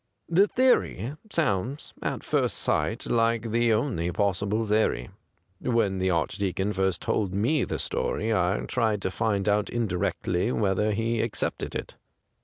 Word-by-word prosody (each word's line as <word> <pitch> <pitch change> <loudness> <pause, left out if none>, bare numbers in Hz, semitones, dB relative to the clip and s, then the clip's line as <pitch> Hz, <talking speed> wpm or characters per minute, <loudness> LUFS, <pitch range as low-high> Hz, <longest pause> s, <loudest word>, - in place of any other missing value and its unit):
The 190 +5 +4
theory 225 - +2 0.2
sounds 135 - -1
at - - -3
first - - +1
sight - - 0
like 115 -1 +1
the 120 +1 +3
only 105 - 0
possible 100 +4 0
theory. 105 - +1 0.5
When 110 -6 +1
the 95 0 +1
Archdeacon 95 +3 0
first 95 -2 0
told 95 -3 0
me 125 +7 +2
the - - -3
storj^ 110 +1 -1
I 95 +1 +1
tried 110 -5 0
to 95 - -1
find 105 -2 0
out 105 0 +2
indirectly 100 -2 -1
whether 105 0 +1
he 115 +2 0
accepted 115 - -3
it. - - -5
105 Hz, 140 wpm, -27 LUFS, 95-115 Hz, 0.5 s, The